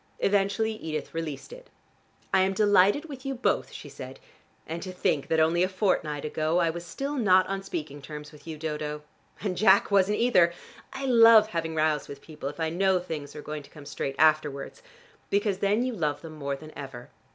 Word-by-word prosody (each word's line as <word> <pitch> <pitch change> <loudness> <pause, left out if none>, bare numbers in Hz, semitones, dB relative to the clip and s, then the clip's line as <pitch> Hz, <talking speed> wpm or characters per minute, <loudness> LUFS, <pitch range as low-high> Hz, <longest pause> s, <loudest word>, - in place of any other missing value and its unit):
Eventually 200 +2 +1
Edith 155 -8 -5
released 165 - -5
it. - - -13 0.6
"I 190 - +5
am 190 +1 +2
delighted 205 - +4
with 275 -5 -9
you 270 -1 -3
both," 245 - 0
she - - -9
said. - - -10 0.5
"And 165 +2 -5
to 185 - -6
think 155 -5 0
that 160 - +1
only 165 +2 +3
a 185 - +2
fortnight 185 -7 -1
ago 155 +2 0
I 170 -2 +2
was 170 +1 -7
still 275 +12 -4
not 185 -6 +4
on 195 +1 -3
speaking 155 -7 -6
terms 150 +2 -9
with 150 +1 -16
you, 160 -1 -6
Dodo. 150 -1 -4 0.4
And 195 -3 -2
Jack 200 +1 +4
wasn't 200 +1 +3
either. 180 -8 +4 0.4
I 270 +1 -5
love 230 -3 +7
having 165 -3 -3
rows 155 -1 +1
with 140 - -9
people 150 -2 -7
if 145 - -11
I 160 -1 -1
know 190 +2 +2
things 155 -5 -6
are 150 - -8
going 150 0 -5
to 140 - -16
come 150 -2 -13
straight 135 -1 -4
afterwards, 155 - +1 0.5
because 200 -1 0
then 205 +5 +1
you 255 - -2
love 150 -7 -2
them 160 -1 -8
more 140 -2 -3
than 155 +2 -12
ever. 130 -3 -9
170 Hz, 200 wpm, -27 LUFS, 150-200 Hz, 0.6 s, love